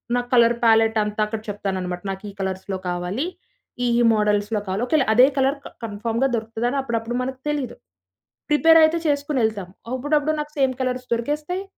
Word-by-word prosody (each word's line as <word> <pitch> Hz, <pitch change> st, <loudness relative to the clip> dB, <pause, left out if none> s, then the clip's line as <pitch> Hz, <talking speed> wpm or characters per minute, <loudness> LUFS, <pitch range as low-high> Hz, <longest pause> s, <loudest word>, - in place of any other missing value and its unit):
నా 245 Hz, -, +2 dB
colour 235 Hz, -1 st, +5 dB
palette 225 Hz, 0 st, +4 dB
అంతా 210 Hz, +1 st, -3 dB
అక్కడ 215 Hz, +1 st, -4 dB
చెప్తానన్నమాట. 185 Hz, -3 st, -3 dB
నాకు 190 Hz, +2 st, -7 dB
ఈ -, -, -8 dB
కలర్స్‌లో 190 Hz, 0 st, -3 dB
కావాలి, 180 Hz, -, -2 dB, 0.6 s
ఈ -, -, +2 dB
ఈ -, -, +4 dB
మోడల్స్‌‌లో 210 Hz, 0 st, +1 dB
కావాలి 195 Hz, +5 st, -1 dB
ఒకేళ 305 Hz, -2 st, +3 dB
అదే 250 Hz, +3 st, +7 dB
కలర్ 270 Hz, +2 st, +2 dB
క -, -, -5 dB, 0.2 s
కన్ఫర్మ్‌గా 230 Hz, +4 st, -1 dB
దొరుకుతదని 230 Hz, +4 st, -2 dB
అప్పుడప్పుడు 235 Hz, -1 st, -3 dB
మనకు 260 Hz, +1 st, -4 dB
తెలీదు. 290 Hz, -5 st, -2 dB, 0.7 s
ప్రిపేర్ 325 Hz, +2 st, +6 dB
అయితే 315 Hz, +2 st, +4 dB
చేసుకొనేళ్తాం. 245 Hz, -10 st, 0 dB, 0.2 s
అప్పుడప్పుడు 290 Hz, +3 st, +1 dB
నాకు 300 Hz, 0 st, -4 dB
సేమ్ 265 Hz, -1 st, +2 dB
కలర్స్ 255 Hz, 0 st, -2 dB
దొరికేస్తాయి, 300 Hz, +10 st, -2 dB
235 Hz, 160 wpm, -22 LUFS, 210-275 Hz, 0.7 s, అదే